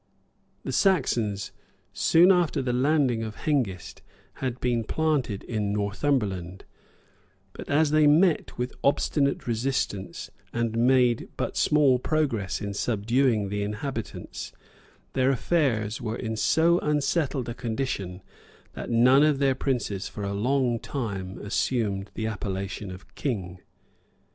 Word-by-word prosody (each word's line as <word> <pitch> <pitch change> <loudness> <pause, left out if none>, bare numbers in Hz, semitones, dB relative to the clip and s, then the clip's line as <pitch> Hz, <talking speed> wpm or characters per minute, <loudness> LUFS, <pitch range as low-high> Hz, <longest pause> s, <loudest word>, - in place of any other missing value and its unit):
] - - -41
The - - -4
Saxons, 120 - +1 0.4
soon 175 +3 +5
after 175 -6 +2
the 125 -1 -1
landing 130 -2 +2
of 110 -1 -5
Hengist, 115 - -2 0.4
had 125 -2 -2
been 120 -2 0
planted 140 -6 -1
in 105 -3 -2
Northumberland; 100 -4 -1 0.9
but - - -9
as 145 +1 +3
they 155 -1 +5
met 160 +3 +3
with 125 +1 -2
an - - -20
obstinate 140 0 +1
resistance, 115 -5 -2 0.2
and 115 -1 -1
made 125 0 +3
but - - -2
small 140 -4 +4
progress 125 -11 -1
in 100 -1 -3
subduing 115 0 +1
the 105 +1 -2
inhabitants, 110 +3 -5 0.6
their 130 0 +2
affairs 125 -6 0
were 115 -1 -3
in 110 -2 -3
so 165 +9 +3
unsettled 145 -3 0
a 120 - -3
condition, 110 -7 -4 0.5
that - - -6
none 125 +4 +5
of 150 -2 +4
their 135 -1 +3
princes 120 -7 -2
for 105 - -7
a 100 0 -2
long 120 +2 +1
time 100 -9 -4
assumed 105 -2 -1
the 110 - -3
appellation 100 -2 -4
of 95 +1 -11
king. 95 -10 -3
120 Hz, 130 wpm, -26 LUFS, 105-140 Hz, 0.9 s, soon